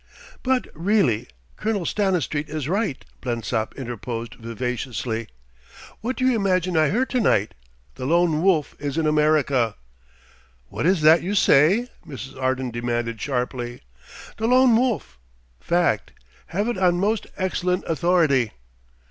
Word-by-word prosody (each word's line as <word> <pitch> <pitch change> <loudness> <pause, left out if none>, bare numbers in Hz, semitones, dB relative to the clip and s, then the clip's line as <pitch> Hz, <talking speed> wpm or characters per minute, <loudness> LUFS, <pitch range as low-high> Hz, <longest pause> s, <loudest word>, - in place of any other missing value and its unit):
"But 260 -1 +1
really, 165 - +1 0.3
Colonel 210 -5 -1
Stanistreet 175 -8 0
is 150 -2 -3
right," 195 - -1 0.2
Blensop 115 -2 -2
interposed 115 -2 -5
vivaciously. 115 0 -4 0.7
"What 250 +4 -3
do 255 - -1
you 260 -2 +4
imagine 185 -4 +1
I 155 -2 +4
heard 250 +6 0
to 255 - +1
night? 105 - +2 0.4
The 130 -1 -5
Lone 165 -1 +2
Wolf 170 -5 +2
is 145 0 -3
in 160 - +1
America!" 150 -7 +2 0.9
"What - - -1
is 185 -3 +3
that 155 +2 +6
you 195 +4 -2
say?" 190 - +4 0.2
Mrs. 135 -1 -9
Arden 130 -1 -1
demanded 120 -1 -2
sharply. 125 -2 -3 0.6
"The 225 - -1
Lone 255 -1 +5
Wolf... 235 - 0 0.4
Fact. 170 -11 0 0.3
Have 200 +6 -1
it 240 -6 -2
on 175 -2 +3
most 210 +3 0
excellent 180 -1 -1
authority." 160 - +2
155 Hz, 130 wpm, -23 LUFS, 125-195 Hz, 0.9 s, that